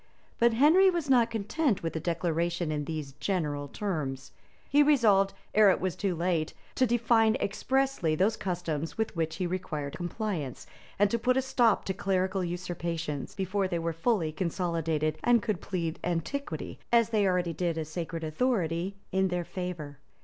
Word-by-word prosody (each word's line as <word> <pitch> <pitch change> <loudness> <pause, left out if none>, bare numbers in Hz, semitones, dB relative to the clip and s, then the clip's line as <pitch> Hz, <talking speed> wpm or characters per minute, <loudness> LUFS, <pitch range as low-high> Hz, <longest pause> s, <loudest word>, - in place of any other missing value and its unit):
But 235 0 +4
Henry 325 +10 +6
was 335 -6 -1
not 240 -3 +5
content 225 - 0
with 165 - -3
a - - 0
declaration 170 0 -1
in 150 -1 -2
these 150 -3 -5
general 150 -7 -1
terms; 140 -8 -4 0.4
he 290 - +4
resolved, 220 -10 +4 0.2
ere 210 -1 +7
it 190 - +3
was 185 -1 -2
too 185 -1 -1
late, 170 -2 -1 0.2
to 255 - +2
define 230 -1 +3
expressly 260 -6 0
those 200 +7 +2
customs 170 -4 -3
with 220 -3 -1
which 160 -1 -1
he 185 - -2
required 155 -6 -3
compliance, 175 - -4 0.3
and 205 0 +3
to 235 - +1
put 250 +2 +2
a - - +4
stop 240 -4 +2
to 190 - -1
clerical 190 0 0
usurpations, 170 -4 -4
before 195 0 0
they 175 -2 -2
were 165 0 -2
fully 165 -2 +1
consolidated, 165 -2 -1
and 240 -3 +4
could 215 -6 -1
plead 170 -4 -3
antiquity, 180 - -3
as 230 -2 +4
they 210 -3 +2
already 180 -2 +1
did 170 0 -1
a 160 - -2
sacred 165 +1 -5
authority, 175 0 0 0.2
in 190 0 +2
their 180 -1 -2
favor. 175 -5 -6
180 Hz, 165 wpm, -29 LUFS, 165-220 Hz, 0.4 s, ere